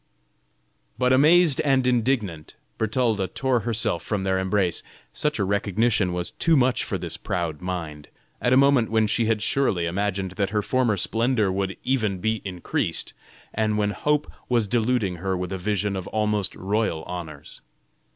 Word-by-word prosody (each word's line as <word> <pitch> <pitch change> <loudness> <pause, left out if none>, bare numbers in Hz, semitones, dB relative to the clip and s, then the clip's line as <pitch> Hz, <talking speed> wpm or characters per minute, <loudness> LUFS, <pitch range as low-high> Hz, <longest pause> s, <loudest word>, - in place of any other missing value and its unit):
But 125 0 +3
amazed 155 +2 +5
and 135 -3 +2
indignant, 115 - 0 0.2
Bertalda 110 -3 +1
tore 130 +6 0
herself 110 -6 -1
from 100 +2 -2
their 95 0 +1
embrace. 95 -2 0 0.3
Such 150 0 0
a 100 - 0
recognition 100 +1 +1
was 90 0 -3
too 165 -2 +2
much 130 -1 +2
for - - -3
this - - -6
proud 85 -4 -3
mind, 80 -5 -5 0.3
at 125 - +1
a 130 - +6
moment 135 -4 +4
when 110 0 +2
she 110 +1 +1
had 110 -2 +1
surely 105 -11 +1
imagined 95 +1 -2
that 100 -2 0
her 105 0 -1
former 125 -4 +1
splendor 110 +1 +1
would 95 0 -2
even 110 -7 0
be 110 +3 -1
increased, 90 -3 -3 0.4
and 110 -1 0
when 105 -1 +1
hope 150 +6 0 0.2
was 120 -4 +2
deluding 110 -4 0
her 95 +2 -2
with 90 0 -4
a 95 - -3
vision 105 0 -1
of 95 -1 -5
almost 105 -2 -1
royal 100 -4 -1
honors. 80 -5 -8
105 Hz, 160 wpm, -24 LUFS, 95-120 Hz, 0.4 s, a